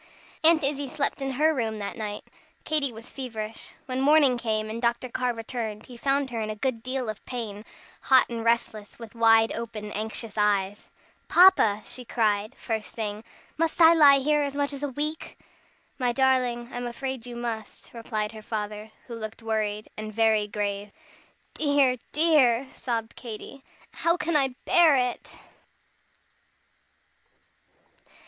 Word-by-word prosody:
Aunt 320 Hz, -1 st, +5 dB
Izzie 280 Hz, 0 st, 0 dB
slept 280 Hz, +1 st, -2 dB
in 270 Hz, 0 st, -2 dB
her 310 Hz, +4 st, +3 dB
room 225 Hz, -5 st, -2 dB
that 200 Hz, -1 st, -5 dB
night. 210 Hz, -2 st, -5 dB, 0.4 s
Katy 300 Hz, -4 st, +3 dB
was 225 Hz, +1 st, -12 dB
feverish. 225 Hz, -5 st, -6 dB
When 255 Hz, 0 st, -3 dB
morning 285 Hz, -2 st, +5 dB
came, 220 Hz, -2 st, -1 dB
and 225 Hz, +2 st, -5 dB
Dr. 235 Hz, +1 st, 0 dB
Carr 250 Hz, +1 st, -1 dB
returned, 225 Hz, -2 st, -5 dB
he 250 Hz, -, -12 dB
found 275 Hz, +2 st, 0 dB
her 230 Hz, -2 st, -3 dB
in 215 Hz, -, -3 dB
a 215 Hz, -, -3 dB
good 230 Hz, +1 st, -2 dB
deal 255 Hz, 0 st, -3 dB
of 215 Hz, -1 st, -6 dB
pain, 215 Hz, -5 st, -5 dB, 0.4 s
hot 260 Hz, -1 st, +5 dB
and 230 Hz, -1 st, -5 dB
restless, 225 Hz, -2 st, -1 dB
with 230 Hz, -3 st, -11 dB
wide 225 Hz, -1 st, +4 dB
open, 215 Hz, -2 st, -6 dB
anxious 220 Hz, +1 st, -3 dB
eyes. 205 Hz, -1 st, 0 dB, 0.4 s
"Papa!" 225 Hz, -, +5 dB
she 255 Hz, -, -7 dB
cried 215 Hz, -3 st, 0 dB
the -, -, -30 dB
first 220 Hz, -2 st, -4 dB
thing, 215 Hz, -1 st, -4 dB, 0.4 s
"must 330 Hz, 0 st, 0 dB
I 330 Hz, 0 st, +8 dB
lie 290 Hz, -4 st, +7 dB
here 295 Hz, +2 st, +2 dB
as 280 Hz, -1 st, -2 dB
much 285 Hz, 0 st, -1 dB
as 280 Hz, -, -6 dB
a 290 Hz, -, -2 dB
week?" 300 Hz, +4 st, -3 dB, 0.6 s
"My 250 Hz, -1 st, +1 dB
darling, 250 Hz, -2 st, +1 dB
I'm 245 Hz, 0 st, -4 dB
afraid 250 Hz, 0 st, -5 dB
you 240 Hz, -, -7 dB
must," 230 Hz, -3 st, -6 dB
replied 215 Hz, -2 st, -3 dB
her 220 Hz, -1 st, -10 dB
father, 210 Hz, 0 st, -5 dB, 0.2 s
who 240 Hz, -, -9 dB
looked 225 Hz, 0 st, -7 dB
worried, 215 Hz, -1 st, -2 dB
and 215 Hz, 0 st, -6 dB
very 220 Hz, -1 st, +2 dB
grave. 205 Hz, -1 st, -3 dB, 0.6 s
"Dear, 285 Hz, -4 st, +2 dB
dear!" 285 Hz, -6 st, +4 dB
sobbed 230 Hz, -3 st, -4 dB
Katy, 245 Hz, +3 st, -9 dB, 0.3 s
"how 335 Hz, +1 st, 0 dB
can 335 Hz, -2 st, -2 dB
I 265 Hz, -3 st, +2 dB
bear 335 Hz, -4 st, +5 dB
it?" 250 Hz, -2 st, -1 dB
235 Hz, 155 wpm, -26 LUFS, 215-270 Hz, 0.6 s, I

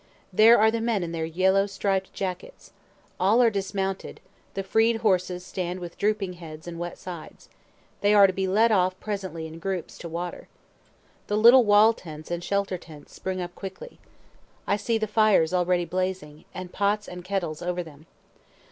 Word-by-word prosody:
There 225 Hz, +5 st, +7 dB
are 220 Hz, +1 st, +5 dB
the 230 Hz, 0 st, -2 dB
men 225 Hz, -5 st, 0 dB
in 170 Hz, -, -4 dB
their 165 Hz, -1 st, -2 dB
yellow 190 Hz, +4 st, +2 dB
striped 195 Hz, -1 st, -1 dB
jackets. 195 Hz, -, -6 dB, 0.5 s
All 200 Hz, +6 st, +4 dB
are 235 Hz, -2 st, +5 dB
dismounted; 195 Hz, -1 st, -3 dB, 0.4 s
the 195 Hz, -, -2 dB
freed 225 Hz, +3 st, +2 dB
horses 180 Hz, -2 st, +1 dB
stand 180 Hz, -1 st, -4 dB
with 175 Hz, -1 st, -8 dB
drooping 205 Hz, -3 st, -1 dB
heads 160 Hz, -2 st, -11 dB
and 170 Hz, -1 st, -7 dB
wet 175 Hz, 0 st, -5 dB
sides; 175 Hz, -4 st, -10 dB, 0.5 s
they 205 Hz, -, +3 dB
are 200 Hz, -1 st, +8 dB
to 190 Hz, -, +2 dB
be 190 Hz, 0 st, -1 dB
led 220 Hz, +5 st, +3 dB
off 185 Hz, -2 st, +2 dB
presently 190 Hz, -6 st, -5 dB
in 160 Hz, +1 st, -9 dB
groups, 185 Hz, -1 st, -4 dB
to 170 Hz, -, -7 dB
water. 175 Hz, +2 st, -5 dB, 0.8 s
The 205 Hz, -, 0 dB
little 235 Hz, +3 st, +7 dB
wall 210 Hz, +2 st, +6 dB
tents 155 Hz, -6 st, -10 dB
and 175 Hz, 0 st, -3 dB
shelter 200 Hz, -1 st, -1 dB
tents 155 Hz, -4 st, -14 dB
spring 185 Hz, -1 st, -4 dB
up 175 Hz, 0 st, -6 dB
quickly. 195 Hz, -, -9 dB, 0.7 s
I 200 Hz, -, +2 dB
see 225 Hz, +3 st, -1 dB
the 220 Hz, -, -1 dB
fires 210 Hz, -6 st, +3 dB
already 180 Hz, -1 st, +1 dB
blazing, 185 Hz, -5 st, -4 dB
and 185 Hz, -1 st, -8 dB
pots 205 Hz, +1 st, 0 dB
and 180 Hz, 0 st, -8 dB
kettles 175 Hz, -5 st, -3 dB
over 180 Hz, 0 st, -2 dB
them. 155 Hz, -1 st, -15 dB
190 Hz, 175 wpm, -26 LUFS, 175-205 Hz, 0.8 s, are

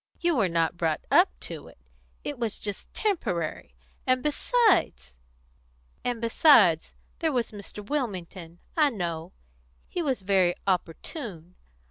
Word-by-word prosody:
You 345 Hz, -1 st, +2 dB
were 200 Hz, -8 st, +2 dB
not 165 Hz, 0 st, +1 dB
brought 160 Hz, -2 st, 0 dB
up -, -, +6 dB
to -, -, -7 dB
it; -, -, -16 dB, 0.5 s
it 285 Hz, -4 st, -5 dB
was 230 Hz, -3 st, -2 dB
just 205 Hz, -2 st, -5 dB
temporary; 175 Hz, -, -2 dB, 0.3 s
and 255 Hz, 0 st, +3 dB
besides 300 Hz, -, +2 dB, 0.5 s
" -, -, -37 dB
"And 245 Hz, -2 st, -1 dB
besides, 225 Hz, -, +5 dB, 0.2 s
there 320 Hz, -2 st, +1 dB
was 245 Hz, -4 st, -1 dB
Mr. 205 Hz, 0 st, -9 dB
Wilmington, 185 Hz, -, -4 dB, 0.2 s
I 305 Hz, -3 st, +5 dB
know. 170 Hz, -8 st, -4 dB, 0.6 s
He 355 Hz, -, -3 dB
was 265 Hz, -, -1 dB
very 185 Hz, -2 st, +3 dB
opportune. 180 Hz, -, -3 dB
200 Hz, 130 wpm, -27 LUFS, 170-275 Hz, 0.6 s, up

